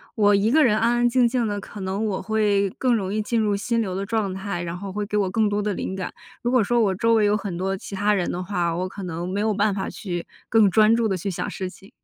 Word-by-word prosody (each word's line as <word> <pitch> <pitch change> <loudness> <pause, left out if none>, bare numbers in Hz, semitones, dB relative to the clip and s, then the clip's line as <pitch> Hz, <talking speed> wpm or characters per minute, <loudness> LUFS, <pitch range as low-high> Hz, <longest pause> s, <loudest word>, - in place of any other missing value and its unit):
我 205 -2 +4
一 200 +2 +3
个 305 +5 +5
人 235 -5 +4
安 230 +2 +2
安 240 0 +3
静 245 0 +3
静 240 0 0
的， 205 -1 -3
可 205 +1 -9
能 190 +3 -2
我 205 -3 -1
会 205 -3 +1
更 250 -2 +3
容 195 -3 -2
易 215 - 0
进 230 +2 0
入 210 -2 +1
心 230 +4 -1
流 200 -5 -1
的 195 - -2
状 205 -2 -1
态， 190 -2 -4
然 170 0 -4
后 195 +2 -6
会 205 +2 -3
给 210 - -4
我 200 -3 +2
更 215 +2 +2
多 205 0 0
的 205 0 -1
灵 190 - -4
感。 185 -2 -4 0.3
如 240 - -1
果 250 -2 +3
说 240 +4 +1
我 195 -4 +2
周 230 +4 +2
围 220 -2 +4
有 205 +1 +3
很 200 -5 -5
多 190 +2 -2
其 195 - -10
他 205 +2 +2
人 185 -3 -1
的 180 - -3
话， 175 -3 -1
我 185 +2 -2
可 195 +1 -8
能 175 0 -4
没 195 +2 -2
有 215 +1 +1
办 205 +1 +2
法 195 - -3
去 175 -4 -5 0.2
更 220 -2 +5
专 215 +4 +5
注 230 -1 +1
地 195 - 0
去 185 +2 -3
想 180 - -3
事 185 -1 -4
情。 195 +1 -16
205 Hz, 315 characters per minute, -23 LUFS, 190-220 Hz, 0.3 s, 个